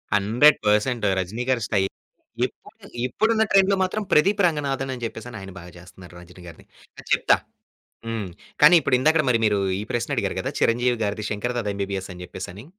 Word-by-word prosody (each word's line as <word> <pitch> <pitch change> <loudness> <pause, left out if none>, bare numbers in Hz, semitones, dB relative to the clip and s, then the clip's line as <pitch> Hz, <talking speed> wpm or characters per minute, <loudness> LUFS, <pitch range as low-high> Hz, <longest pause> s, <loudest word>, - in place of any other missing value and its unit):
100% 110 +1 +3
రజనీ 100 +7 -3
గారి 125 -2 +1
స్టైల్. 95 -2 0 0.5
ఇప్పుడు, - - -12 0.2
ఇప్పుడున్న 220 - +1
ట్రెండ్‌లో 195 0 +4
మాత్రం 205 +3 -2
ప్రదీప్ 195 +6 +3
రంగనాథన్ 135 -4 -2
అని 120 -2 -8
చెప్పేసి 115 +1 -7
ఆయన 95 - -9
బాగా 90 0 -12
చేస్తున్నారు 90 0 -14
రజనీ 90 +1 -15
గారిని. 85 - -13 0.3
ఆ! - - -8
చెప్తా. - - +4 0.7
హ్మ్. 110 -4 -4 0.3
కానీ 150 +4 +8
ఇప్పుడు 140 -3 +2
ఇందాక 155 +4 +3
మరి 115 -2 +3
మీరు 105 -2 +2 0.2
ఈ - - -4
ప్రశ్న 120 -1 -2
అడిగారు - - -1
కదా! - - -3
చిరంజీవి 120 +1 +2
గారిది 105 +1 -3
శంకర్ 115 +4 -3
దాదా 105 -3 -2
ఎంబీబీఎస్ 100 -1 -4
అని 90 - -10
చెప్పేసి. 95 +4 -9
115 Hz, 170 wpm, -23 LUFS, 100-140 Hz, 0.7 s, కానీ